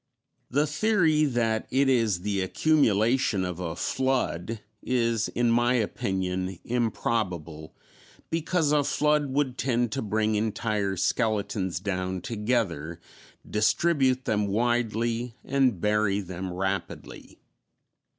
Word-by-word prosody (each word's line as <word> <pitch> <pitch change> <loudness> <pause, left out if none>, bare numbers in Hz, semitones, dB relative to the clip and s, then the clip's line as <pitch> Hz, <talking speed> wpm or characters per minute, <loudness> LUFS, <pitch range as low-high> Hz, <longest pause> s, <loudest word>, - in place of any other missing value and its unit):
The 145 +4 +2
theory 155 -1 +2
that 115 -5 0
it 135 +2 +2
is 115 -8 +2
the 100 0 -1
accumulation 110 -3 +2
of 90 -1 -5
a 85 -3 -4
flood 125 -6 -1 0.2
is, 115 -3 0
in 120 -1 +1
my 120 +2 +3
opinion, 95 -4 -2
improbable, 90 -9 -2 0.6
because 165 -1 +1
a 150 -1 +3
flood 150 0 +1
would 130 -2 -1
tend 120 -3 0
to 135 - -2
bring 110 0 0
entire 105 -2 -1
skeletons 100 -3 0
down 95 -1 -3
together, 105 -8 -2 0.5
distribute 130 +4 +2
them 105 -1 +1
widely, 115 +1 0
and 130 -7 +2
bury 105 0 +1
them 95 -1 -5
rapidly. 95 +2 -4
110 Hz, 110 wpm, -27 LUFS, 95-130 Hz, 0.6 s, my